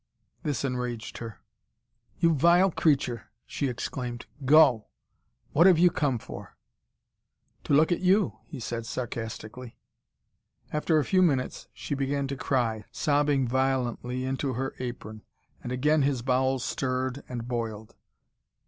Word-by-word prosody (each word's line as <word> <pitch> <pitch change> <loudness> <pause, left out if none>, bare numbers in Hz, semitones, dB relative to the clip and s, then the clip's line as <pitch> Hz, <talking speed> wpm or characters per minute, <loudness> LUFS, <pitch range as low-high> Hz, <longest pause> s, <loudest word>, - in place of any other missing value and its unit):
This 145 -2 -2
enraged 125 -3 -4
her. 115 -3 -8 0.8
"You 165 -1 +3
vile 175 +6 +4
creature!" 135 -8 0 0.2
she 140 - -2
exclaimed. 125 -1 -4 0.2
"Go! 135 -5 +5 0.6
What 170 +5 +6
have 180 -3 +6
you 175 +1 +5
come 140 -6 0
for?" - - -10 1.1
"To - - 0
look 155 +4 +5
at 175 - +1
YOU," 185 +1 +2
he - - -8
said 115 -1 -4
sarcastically. 115 0 -6 1.0
After 155 +1 +2
a 150 - +2
few 185 -1 +3
minutes 140 -8 0
she - - -5
began 140 0 -1
to 140 - -2
cry, 120 -5 -1
sobbing 145 -3 +1
violently 130 -1 -1
into 135 0 -2
her 135 +3 -3
apron. 110 -3 -6 0.4
And 120 - -6
again 150 +4 +2
his 135 -3 0
bowels 130 0 +1
stirred 130 +1 -2
and 120 -2 -5
boiled. 115 -3 -4
130 Hz, 130 wpm, -27 LUFS, 120-145 Hz, 1.1 s, What